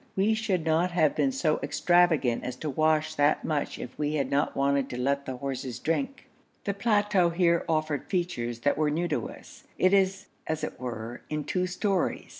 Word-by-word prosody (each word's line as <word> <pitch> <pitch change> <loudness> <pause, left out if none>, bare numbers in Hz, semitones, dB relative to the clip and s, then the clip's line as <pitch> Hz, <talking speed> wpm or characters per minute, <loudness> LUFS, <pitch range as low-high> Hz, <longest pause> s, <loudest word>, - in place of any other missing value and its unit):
We 200 +3 +3
should 200 -7 -1
not 165 +3 +2
have 155 -4 +3
been 270 - +2
so 165 - +1
extravagant 160 -4 +2
as 125 - -4
to 155 - -4
wash 155 +2 +2
that 145 0 +2
much 150 -2 -1
if 125 - -8
we 150 0 0
had 140 -3 -1
not 140 +1 +1
wanted 140 -1 +1
to 125 - -5
let 140 +2 0
the 130 -1 -4
horses 130 -2 -4
drink. 275 - -2 0.4
The 200 - -1
plateau 205 -3 +2
here 170 0 +2
offered 155 -3 0
features 120 - -2
that 145 +3 +1
were 155 -1 +2
new 165 +4 0
to - - -1
us. - - -14
It 185 +1 +3
is 195 0 +2 0.2
as 155 0 -2
it - - -4
were 120 -1 -6
in 150 -1 -2
two 180 +3 -1
stories. 190 0 -1
155 Hz, 195 wpm, -28 LUFS, 140-185 Hz, 0.4 s, We